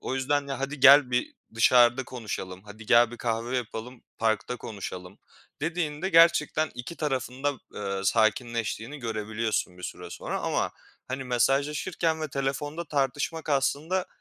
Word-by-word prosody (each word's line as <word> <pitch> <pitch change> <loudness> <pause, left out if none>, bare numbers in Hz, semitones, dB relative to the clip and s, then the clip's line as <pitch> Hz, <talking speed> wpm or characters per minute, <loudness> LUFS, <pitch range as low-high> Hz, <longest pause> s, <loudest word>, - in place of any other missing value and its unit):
O 130 - -3
yüzden, 140 +2 0
ya, 135 - -3
"Hadi 140 0 -4
gel 140 -1 +8
bir 125 - -1 0.2
dışarıda 120 +2 +5
konuşalım, 100 -7 -6
hadi 105 +1 -12
gel 120 -1 +6
bir 120 - -8
kahve 120 +2 -2
yapalım, 120 +1 -6 0.2
parkta 110 +2 0
konuşalım." 95 -3 -7 0.4
dediğinde 165 +1 -2
gerçekten 165 -2 +4
2 125 +8 -7
tarafın 130 -3 -3
da, 145 - +3 0.2
eee, 100 -1 -3
sakinleştiğini 115 +4 0
görebiliyorsun 110 -4 -2
bir - - -12
süre 90 -1 -7
sonra. - - -4
Ama - - 0 0.4
hani 130 +1 -4
mesajlaşırken 150 +6 +1
ve 155 - -2
telefonda 145 +4 -3
tartışmak 145 +2 -2
aslında 150 +6 0
130 Hz, 140 wpm, -27 LUFS, 115-145 Hz, 0.4 s, gel